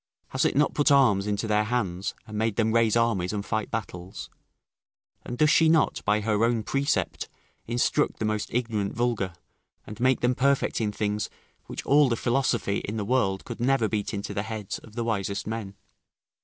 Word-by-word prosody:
has - - 0
it - - +1
not 145 +1 +3
put 145 - +3
arms 110 -8 +4
into 105 +2 -1
their 105 -1 +2
hands, 100 -6 -2
and 110 -2 -9
made 110 -1 0
them 110 0 +1
raise 115 -2 +3
armies 115 -6 +1
and 105 -1 -3
fight 110 -1 -2
battles? 95 -4 -6 0.9
And 120 - -6
does 150 +2 +4
she 160 0 +5
not, 160 0 +2
by 105 +1 +2
her 105 0 +1
own 115 -1 +2
precept, 140 +5 -1 0.4
instruct 120 +5 +1
the 110 - -2
most 110 -1 -2
ignorant 115 -4 -1
vulgar, 115 -6 -1 0.5
and 105 +1 -9
make 130 +1 +2
them 125 +1 +3
perfect 135 -1 +1
in 105 -2 0
things 105 0 -2 0.4
which - - -6
all 145 -1 +5
the 115 - +1
philosophy 120 -4 0
in 105 +2 -5
the 105 - -2
world 100 -5 0
could - - -7
never 125 -2 +2
beat 105 -1 -2
into 100 -1 -4
the 100 - -1
heads 110 -2 -5
of 110 - -16
the 120 - -1
wisest 100 -3 -2
men? 110 -3 -5
110 Hz, 190 wpm, -26 LUFS, 105-120 Hz, 0.9 s, she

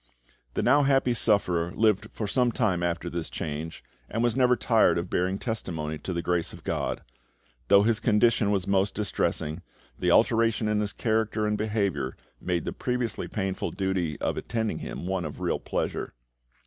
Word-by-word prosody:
The - - 0
now 145 - +5
happy 135 -3 +3
sufferer 90 -7 +2
lived 110 -1 +2
for 110 - -4
some 125 +3 +2
time 100 -7 +1
after 85 -1 -1
this 85 -1 -4
change, 80 -2 -5 0.3
and 115 - -1
was 120 -2 +2
never 125 -1 +4
tired 115 -6 +3
of 85 +1 -3
bearing 95 +2 +1
testimony 80 -10 -4
to - - -5
the 85 -1 -2
grace 90 -1 0
of - - -12
GOD. - - -2 0.6
Though 100 +7 +6
his 115 0 +2
condition 110 0 +3
was 100 -3 +1
most 100 0 +1
distressing, 80 -6 -1 0.4
the - - +1
alteration 115 -1 +3
in 105 0 +1
his 105 -1 -1
character 110 0 0
and 105 0 +1
behaviour 100 - -1 0.3
made 90 -3 -1
the - - -3
previously 125 -3 -2
painful 95 -3 -2
duty 95 -6 -2
of - - -1
attending 110 -2 -2
him - - -6
one 95 -1 -1
of 75 -2 -6
real - - -1
pleasure. - - -3
100 Hz, 175 wpm, -27 LUFS, 90-115 Hz, 0.6 s, Though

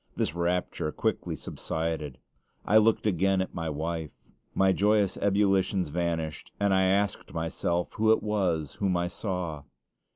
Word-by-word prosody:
This - - 0
rapture 85 -2 -1
quickly - - -1
subsided. 80 -4 -4 0.5
I 105 - +5
looked 110 0 +4
again 95 -1 +2
at 95 - -2
my 80 -2 -3
wife. 80 +1 -3 0.5
My 95 0 +4
joyous 100 0 +2
ebullitions 95 -3 +2
vanished, 80 -1 -2
and 100 -1 +2
I 95 0 +4
asked 100 0 0
myself 85 +1 -1
who 110 0 +3
it 110 - +3
was 90 -8 0
whom 95 -3 +1
I 85 0 0
saw. 90 -5 -4
90 Hz, 140 wpm, -28 LUFS, 80-100 Hz, 0.5 s, I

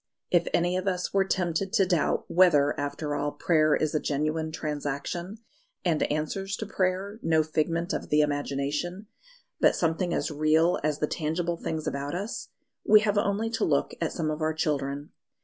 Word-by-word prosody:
If 175 -1 +3
any 175 +1 +1
of 185 +1 -3
us 180 -2 -1
were 195 -1 +3
tempted 185 +1 -1
to 200 -4 +4
doubt 175 -4 +1
whether, 150 -6 +4
after 145 +1 -3
all, 145 0 -1
prayer 155 -3 +3
is 155 - 0
a 155 - +2
genuine 155 +2 -1
transaction, 155 +5 -4 0.5
and 165 -4 +2
answers 190 +6 -2
to 220 - -4
prayer 195 +1 -1
no 160 -1 +3
figment 165 +3 -1
of - - -4
the 150 0 +4
imagination 145 +6 -2 0.5
but - - +4
something 170 +1 0
as 150 - -1
real 155 +3 +3
as 150 -1 0
the 150 - +1
tangible 165 +3 -2
things 160 -2 -4
about 140 +3 -3
us 200 +6 -4 0.3
we 215 0 +7
have 205 -1 +2
only 205 +2 0
to 225 - -1
look 140 -2 +1
at 165 - 0
some 155 -2 -2
of 155 +1 -4
our 155 0 0
children. 145 -2 -2
160 Hz, 175 wpm, -27 LUFS, 150-185 Hz, 0.5 s, we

